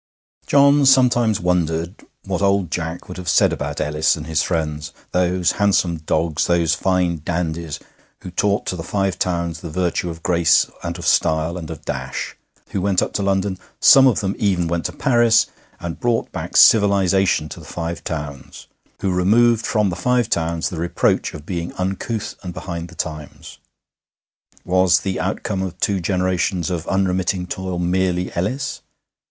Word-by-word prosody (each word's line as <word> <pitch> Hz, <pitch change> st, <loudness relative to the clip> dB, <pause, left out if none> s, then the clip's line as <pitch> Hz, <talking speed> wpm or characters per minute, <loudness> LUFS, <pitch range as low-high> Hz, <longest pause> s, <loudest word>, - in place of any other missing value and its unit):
John 140 Hz, 0 st, +5 dB
sometimes 120 Hz, -5 st, +4 dB
wondered 85 Hz, -1 st, -1 dB, 0.2 s
what -, -, -2 dB
old 100 Hz, -3 st, +1 dB
Jack 80 Hz, 0 st, -4 dB
would 90 Hz, -, -8 dB
have 90 Hz, -1 st, -4 dB
said -, -, +4 dB
about -, -, -4 dB
Ellis 75 Hz, +1 st, +1 dB
and 75 Hz, -2 st, -7 dB
his 80 Hz, -1 st, 0 dB
friends, 75 Hz, -3 st, -2 dB, 0.2 s
those 90 Hz, 0 st, +1 dB
handsome 95 Hz, -4 st, +1 dB
dogs, 80 Hz, 0 st, -1 dB
those 85 Hz, -2 st, +2 dB
fine 90 Hz, -4 st, 0 dB
dandies, 85 Hz, -2 st, -3 dB, 0.4 s
who 90 Hz, -, -8 dB
taught 100 Hz, +3 st, 0 dB
to -, -, -2 dB
the 85 Hz, -, -5 dB
Five 95 Hz, +1 st, -2 dB
Towns 85 Hz, -2 st, -1 dB
the 85 Hz, -, -6 dB
virtue 90 Hz, +2 st, -1 dB
of 80 Hz, -1 st, -8 dB
grace 85 Hz, -3 st, +4 dB, 0.2 s
and -, -, -4 dB
of -, -, -7 dB
style 80 Hz, +2 st, +2 dB
and 85 Hz, -4 st, -7 dB
of 80 Hz, -3 st, -8 dB
dash, -, -, -4 dB, 0.3 s
who 95 Hz, -, -2 dB
went 95 Hz, -1 st, +2 dB
up -, -, -4 dB
to -, -, -1 dB
London 95 Hz, -1 st, 0 dB, 0.2 s
some 135 Hz, -1 st, +7 dB
of 120 Hz, -, +2 dB
them 100 Hz, 0 st, -2 dB
even 95 Hz, -5 st, +1 dB
went 85 Hz, 0 st, -2 dB
to -, -, -1 dB
Paris 120 Hz, -4 st, +3 dB, 0.3 s
and 85 Hz, -1 st, -6 dB
brought 120 Hz, -3 st, 0 dB
back -, -, -3 dB
civilization 95 Hz, -5 st, +4 dB
to -, -, -9 dB
the -, -, -12 dB
Five 85 Hz, 0 st, -5 dB
Towns, 75 Hz, -5 st, -6 dB, 0.4 s
who 95 Hz, -, 0 dB
removed 110 Hz, +5 st, +3 dB
from 105 Hz, -4 st, +1 dB
the -, -, -3 dB
Five 120 Hz, +5 st, 0 dB
Towns 85 Hz, 0 st, 0 dB
the 85 Hz, -, -6 dB
reproach 85 Hz, +1 st, 0 dB
of 75 Hz, -1 st, -10 dB
being 85 Hz, -2 st, -4 dB
uncouth 95 Hz, +4 st, -3 dB
and 90 Hz, -2 st, -7 dB
behind 85 Hz, -2 st, -5 dB
the 85 Hz, -, -15 dB
times. 75 Hz, -3 st, -7 dB, 1.1 s
Was 90 Hz, -1 st, +3 dB
the 95 Hz, -1 st, -3 dB
outcome 95 Hz, +1 st, -2 dB
of 95 Hz, -1 st, -5 dB
two 100 Hz, 0 st, +1 dB
generations 90 Hz, -1 st, 0 dB
of 85 Hz, -2 st, -3 dB
unremitting 95 Hz, -1 st, 0 dB
toil 95 Hz, 0 st, -4 dB
merely 90 Hz, 0 st, 0 dB
Ellis? 125 Hz, +11 st, -2 dB
90 Hz, 170 wpm, -20 LUFS, 85-95 Hz, 1.1 s, some